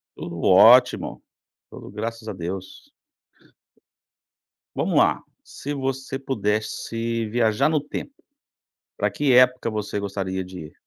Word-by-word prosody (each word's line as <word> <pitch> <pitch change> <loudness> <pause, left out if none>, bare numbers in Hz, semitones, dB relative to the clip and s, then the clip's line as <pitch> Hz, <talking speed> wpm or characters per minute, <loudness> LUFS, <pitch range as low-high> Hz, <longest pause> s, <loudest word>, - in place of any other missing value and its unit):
Tudo 85 -1 -7
ótimo, 120 +7 +5 0.5
tudo - - -11
graças 110 +2 -5
a 110 - -4
Deus. 95 - -7 1.8
Vamos - - 0
lá! - - +3 0.2
Se 145 - -8
você 135 0 -3
pudesse 115 -1 -2
viajar 120 +4 +2
no 155 -1 +2
tempo. 145 - -7 0.9
Pra - - +1
que 145 -2 0
época 125 -1 +4
você 105 -1 -3
gostaria 95 -2 -3
de 90 0 -10
ir? - - -20
115 Hz, 115 wpm, -23 LUFS, 100-130 Hz, 1.8 s, ótimo